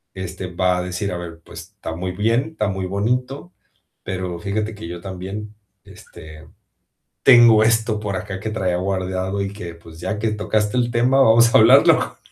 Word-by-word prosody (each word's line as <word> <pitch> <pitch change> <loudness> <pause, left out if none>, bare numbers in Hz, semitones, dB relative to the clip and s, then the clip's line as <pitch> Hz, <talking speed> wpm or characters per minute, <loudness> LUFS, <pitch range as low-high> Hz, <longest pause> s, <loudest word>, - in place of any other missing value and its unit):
este, 95 0 -6
va 90 0 0
a - - -1
decir, 90 +2 -4
a 90 - -3
ver, 85 -1 -9
pues, - - -10 0.2
está 80 - -6
muy 90 +2 -4
bien, 115 - 0
está 105 -10 -2
muy 95 -1 -3
bonito, 125 - -2 0.5
pero, 90 -2 -4
fíjate 105 +3 -3
que 105 -4 -9
yo 85 0 -7
también, 95 +3 -7 0.3
este, 75 0 -14 0.8
tengo 120 -4 +7
esto 110 -1 +1
por 105 -2 -4
acá 95 0 -5
que 110 +2 -5
traía 95 -5 -1
guardado 95 +1 -2
y 100 0 -3
que, 90 -5 -8
pues, 85 -1 -15
ya 95 +4 -4
que 110 0 -1
tocaste 105 +1 -1
el 120 -1 0
tema, 125 +3 +2
vamos 115 -1 +5
a - - +10
hablarlo 125 +5 +5
100 Hz, 180 wpm, -20 LUFS, 90-110 Hz, 0.8 s, a